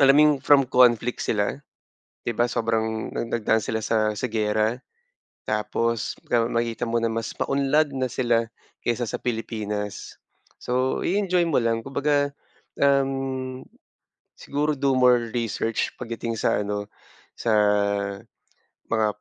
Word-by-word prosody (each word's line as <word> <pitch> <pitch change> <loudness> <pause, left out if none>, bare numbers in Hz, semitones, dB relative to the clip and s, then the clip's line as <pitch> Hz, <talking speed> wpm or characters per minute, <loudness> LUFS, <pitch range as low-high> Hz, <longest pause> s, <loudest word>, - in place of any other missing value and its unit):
Alam 135 0 +7
mo - - +7
yung 150 -1 +4
from 140 -1 +6
conflict 125 -2 +4
sila? 105 +3 0 0.7
'Di 120 - 0
ba, 120 0 +2
sobrang 110 -1 -1
nag - - -3
nagdaan 110 -1 +2
sila 110 - -2
sa 110 -1 +1
sa - - -1
giyera, 110 +2 +1 0.7
tapos 110 +1 -1 0.4
makikita 115 0 -1
mo 115 +1 0
na 115 - +2
mas 115 0 -3
maunlad 140 +2 +2
na 130 - +1
sila 120 -2 +1 0.4
kaysa 120 0 0
sa - - -3
Pilipinas. 105 -3 -4 0.4
So, 130 +1 0
i-enjoy 185 -2 +2
mo 155 - +2
lang, 115 0 +1
kumbaga, 145 +1 +1 0.5
uhm, 135 -2 0 0.7
siguro 150 +1 -1
do 140 0 +1
more 125 -2 +4
research 115 -1 -1
pagdating 115 0 -4
sa - - +1
ano, 105 0 -4 0.5
sa 115 - 0 1.4
mga 110 -1 +3
120 Hz, 130 wpm, -24 LUFS, 110-135 Hz, 1.4 s, Alam